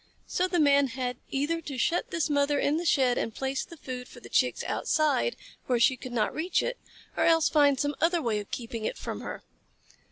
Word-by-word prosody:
So 365 Hz, -, 0 dB
the 355 Hz, -1 st, 0 dB
Man 280 Hz, -2 st, +5 dB
had 250 Hz, 0 st, -3 dB
either 295 Hz, +5 st, -1 dB
to 285 Hz, -4 st, -6 dB
shut 335 Hz, +8 st, 0 dB
this 335 Hz, -4 st, 0 dB
mother 285 Hz, -1 st, +2 dB
in 295 Hz, +2 st, +1 dB
the 340 Hz, +1 st, -2 dB
shed 255 Hz, -4 st, +3 dB
and 225 Hz, -, -3 dB
place 265 Hz, 0 st, -2 dB
the 335 Hz, -, -12 dB
food 250 Hz, -3 st, -6 dB
for -, -, -13 dB
the -, -, -13 dB
Chicks -, -, +1 dB
outside, 310 Hz, +10 st, +1 dB, 0.3 s
where 245 Hz, -2 st, +2 dB
she 260 Hz, +3 st, +4 dB
could 255 Hz, 0 st, -9 dB
not 220 Hz, -3 st, 0 dB
reach 335 Hz, +3 st, 0 dB
it, -, -, -3 dB, 0.4 s
or -, -, +2 dB
else 325 Hz, -2 st, +4 dB
find 285 Hz, -3 st, +4 dB
some 290 Hz, 0 st, 0 dB
other 340 Hz, +2 st, +3 dB
way 230 Hz, -8 st, 0 dB
of 205 Hz, -, -8 dB
keeping 230 Hz, -2 st, -5 dB
it -, -, -2 dB
from -, -, -5 dB
her. -, -, -7 dB
285 Hz, 220 wpm, -28 LUFS, 250-325 Hz, 0.4 s, Man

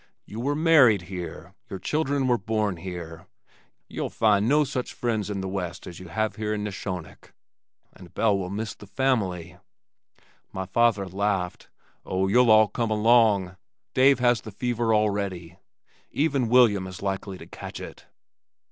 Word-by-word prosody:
"You 110 Hz, -, -8 dB
were 140 Hz, +4 st, -1 dB
married 145 Hz, -, +5 dB
here, 85 Hz, 0 st, -7 dB, 0.2 s
your 95 Hz, -, -5 dB
children 140 Hz, -, -1 dB
were 120 Hz, -1 st, +2 dB
born 105 Hz, -2 st, -1 dB
here. 85 Hz, -2 st, -8 dB, 0.6 s
Ye'll -, -, -4 dB
find 105 Hz, 0 st, +2 dB
no 150 Hz, +2 st, +4 dB
such 130 Hz, -2 st, -4 dB
friends 110 Hz, -4 st, -2 dB
in 100 Hz, -2 st, -3 dB
the 95 Hz, -, -4 dB
west 90 Hz, -2 st, -5 dB
as 85 Hz, -, -9 dB
you 95 Hz, -, -10 dB
have 110 Hz, +5 st, -2 dB
here 105 Hz, 0 st, -2 dB
in 105 Hz, -, -4 dB
Neshonoc. 95 Hz, -4 st, -7 dB, 0.6 s
And 90 Hz, -3 st, -15 dB
Belle 110 Hz, -3 st, +2 dB
will 95 Hz, -2 st, -3 dB
miss 105 Hz, +3 st, -4 dB
the 105 Hz, -, -14 dB
family." 95 Hz, -9 st, -1 dB, 0.9 s
My 95 Hz, 0 st, -4 dB
father 105 Hz, -1 st, +2 dB
laughed. 95 Hz, -1 st, -2 dB, 0.3 s
"Oh, 95 Hz, +1 st, -1 dB
you'll 120 Hz, +4 st, +4 dB
all 110 Hz, 0 st, +7 dB
come 115 Hz, +1 st, -2 dB
along. 105 Hz, -4 st, +3 dB, 0.4 s
Dave 135 Hz, +1 st, +5 dB
has 120 Hz, -2 st, +2 dB
the -, -, -9 dB
fever 120 Hz, +2 st, -1 dB
already. 100 Hz, -5 st, -1 dB, 0.5 s
Even 140 Hz, -5 st, 0 dB
William 110 Hz, -6 st, +4 dB
is 95 Hz, +1 st, -9 dB
likely 95 Hz, -1 st, -3 dB
to -, -, -11 dB
catch -, -, -9 dB
it." -, -, -10 dB
105 Hz, 155 wpm, -25 LUFS, 95-120 Hz, 0.9 s, all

